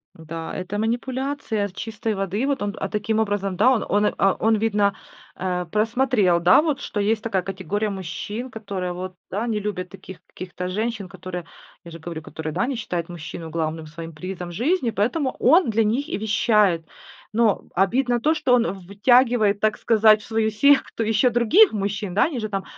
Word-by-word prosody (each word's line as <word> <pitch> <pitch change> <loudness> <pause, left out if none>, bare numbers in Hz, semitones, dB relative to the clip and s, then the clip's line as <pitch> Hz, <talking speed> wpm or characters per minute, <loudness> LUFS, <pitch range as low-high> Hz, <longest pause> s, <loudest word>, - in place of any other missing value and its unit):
Да, 165 0 -7
это 190 +3 -4
манипуляция 245 -1 -2
чистой 220 +3 -4
воды, 195 +6 -2
вот, 280 -5 0
он, 205 +1 -2
а, - - -2
таким 220 +1 -1
образом 200 -3 -1
да, 255 - +5
он 245 - +1
он, 205 +1 +2
а, 195 - +4
он 220 0 +3
видно, 205 -2 +1 0.4
э, 180 -1 -2
просмотрел, 220 -4 +2
да, 180 - +6
вот, 295 -4 -1
что 210 - -5
есть 215 +2 +1
такая 195 -5 -1
категория 195 +3 -3
мужчин, 205 +6 -5
которые, 200 -5 -4
вот, 185 +1 -6 0.2
да, 215 +5 -2
не 215 -3 -1
любят 185 -3 -4
таких 190 -1 -11
каких-то 180 0 -7
женщин, 215 0 -3
которые, 180 -1 -7 0.4
я 170 - -10
же 165 - -8
говорю, 160 0 -6
которые, 160 0 -6
да, 240 - 0
не 275 - -2
считают 180 -7 -3
мужчину 165 -1 -7
главным 160 0 -3
своим 165 +2 -8
призом 180 +2 -6
жизни. 250 - 0
Поэтому 250 +7 -1
он 315 0 +5
для 220 +1 +2
них 260 +9 0
и - - -2
вещает, 210 -5 +2 0.5
но 225 -2 +2
обидно 240 +6 +2
то, 310 +5 +2
что 275 -5 +2
он 235 -5 +2
втягивает, 215 +2 +3
так 215 0 +2
сказать, 215 -1 +4
в - - -13
свою 220 -1 0
секту 230 0 +3
еще 225 +3 +3
других 240 - +5
мужчин, 200 -2 -3
да. 205 - +4
Они 280 -5 -2
же 215 - -3
там 195 -1 -3
210 Hz, 185 wpm, -23 LUFS, 185-230 Hz, 0.5 s, да